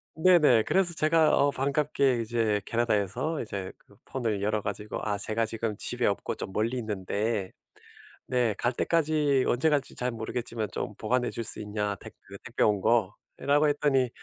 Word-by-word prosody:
네네. 160 -9 +5
그래서 185 -3 +3
제가 160 0 +3
어 145 - +3
반갑게 140 -2 +1
이제 110 -2 0
캐나다에서 120 - 0
이제 100 -4 -5
그 - - -23
폰을 110 -6 -2
열어 105 0 0
가지고 105 +1 -5
"아 105 -1 -1
제가 110 +2 -1
지금 110 -1 -3
집에 - - -1
없고 - - -1
좀 95 - -6
멀리 115 +4 0
있는데 105 -1 -2 0.8
네 120 -4 +1
갈 120 - 0
때까지 150 -2 +1
언제 130 +6 +2
갈지 145 -3 0
잘 125 0 -1
모르겠지만 115 -1 -4
좀 - - -4
보관해줄 120 -2 -1
수 - - 0
있냐, 105 -1 -2
택배 - - -12
그 - - -10
택배 - - -3
온 105 -2 +2
거."라고 140 +6 +1
했더니 140 -3 +2
120 Hz, 330 characters per minute, -28 LUFS, 105-140 Hz, 0.8 s, 네네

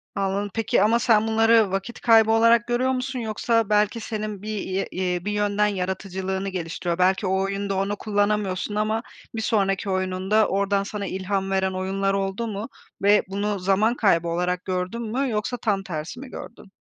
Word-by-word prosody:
Anladım, 200 +1 -1
peki, 225 -3 +1
ama 225 +3 +3
sen 225 -3 +3
bunları 225 -2 +4
vakit 195 +5 -4
kaybı 225 -2 +5
olarak 230 +1 +4
görüyor 245 +2 +1
musun 260 0 -2
yoksa 225 0 0
belki 210 +2 +2
senin 215 -2 -5
bir 215 - -6
ye 190 0 -2
ye 180 -1 -2
bir 210 - -1
yönden 210 0 +1
yaratıcılığını 190 0 -3
geliştiriyor? 175 -1 -3
Belki 185 +2 +2
o 190 +1 +1
oyunda 195 0 -2
onu 195 +2 -1
kullanamıyorsun 205 -1 -1
ama 215 +2 0 0.3
bir 220 - -2
sonraki 195 -2 0
oyununda 185 +3 +1
oradan 200 0 +1
sana 205 0 -5
ilham 190 +1 -2
veren 190 0 +1
oyunlar 195 +1 -1
oldu 195 +3 -2
mu 210 +3 -5 0.3
ve 205 +1 +5
bunu 200 +1 -2
zaman 195 +5 +2
kaybı 170 -7 +2
olarak 180 +2 -1
gördün 185 +4 -2
mü 250 +4 -1
yoksa 215 +2 -2
tam 200 -4 -1
tersi 170 +4 -6
mi 270 0 -9
gördün? 215 -5 -10
200 Hz, 170 wpm, -24 LUFS, 190-220 Hz, 0.3 s, kaybı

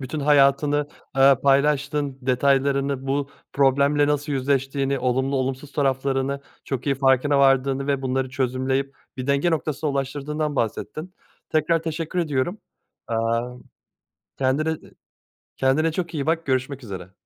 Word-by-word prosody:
Bütün 140 +3 -4
hayatını, 145 0 +3 0.3
eee, 135 +1 +7
paylaştın 140 0 +1
detaylarını, 135 +1 +1
bu 140 +1 -1 0.2
problemle 140 +1 +3
nasıl 150 0 -1
yüzleştiğini, 135 0 0
olumlu 130 +2 0
olumsuz 135 +2 -3
taraflarını 135 0 0 0.2
çok 135 -1 -4
iyi 140 - +2
farkına 135 +1 +3
vardığını 135 0 +3
ve 140 -1 0
bunları 130 0 -1
çözümleyip 130 +1 -1 0.2
bir 130 -1 -5
denge 140 +5 +2
noktasına 155 -1 -1
ulaştırdığından 145 +2 -2
bahsettin. 155 - -3 0.4
Tekrar 160 +1 +2
teşekkür 165 +2 -3
ediyorum. 160 +3 -1 0.5
Aaa, 115 0 0
ımm, 125 - -14 0.8
kendine 135 +4 +1
e - - -1 0.8
kendine 155 +5 +2
çok 170 -1 -4
iyi 145 -2 -2
bak, 165 +1 0
görüşmek 130 0 -1
üzere. 95 -3 -8
140 Hz, 130 wpm, -23 LUFS, 130-145 Hz, 0.8 s, eee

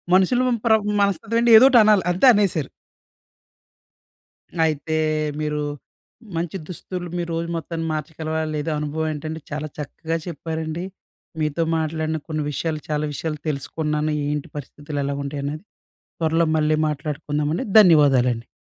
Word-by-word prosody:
మనుషులు 190 +7 +3 0.2
ప్ర 225 - +5 0.3
మనస్తత్వం 200 +3 +1
అంటే 235 0 +4
ఏదో 240 - +8
ఒకటి 250 -3 +6
అనాలి. 210 -2 +4
అంతే 180 +8 +2
అనేసారు. 195 - +1 2.0
అయితే 155 +1 -2 0.4
మీరు 150 0 -1 0.7
మంచి 170 +2 -2
దుస్తులు 180 0 -6
మీరు 170 -1 -3
రోజు 170 +1 -3
మొత్తాన్ని 165 0 -4
మార్చగలవా? 155 +1 -3
లేదా? 150 +2 -2
అనుభవం 150 +1 -2
ఏంటంటే, 155 +2 -5
చాలా 150 +1 -3
చక్కగా 160 +2 -4
చెప్పారండి. 160 0 -4 0.6
మీతో 155 +2 0
మాట్లాడిన 160 0 -1
కొన్ని 155 -2 -2
విషయాలు, 155 +2 -2
చాలా 150 0 0
విషయాలు 155 +1 -4
తెలుసుకున్నాను. 150 +2 -2 0.2
ఏంటి 150 -1 -3
పరిస్థితులు 145 +1 -6
ఎలా 140 0 -2
ఉంటాయి 140 0 -4
అనేది. 150 +4 -4 0.6
త్వరలో 165 +1 +2
మళ్ళీ 155 0 +2
మాట్లాడుకుందామండి. 150 +1 -2
ధన్యవాదాలండి. 135 - +5
155 Hz, 125 wpm, -22 LUFS, 150-170 Hz, 2.0 s, ఏదో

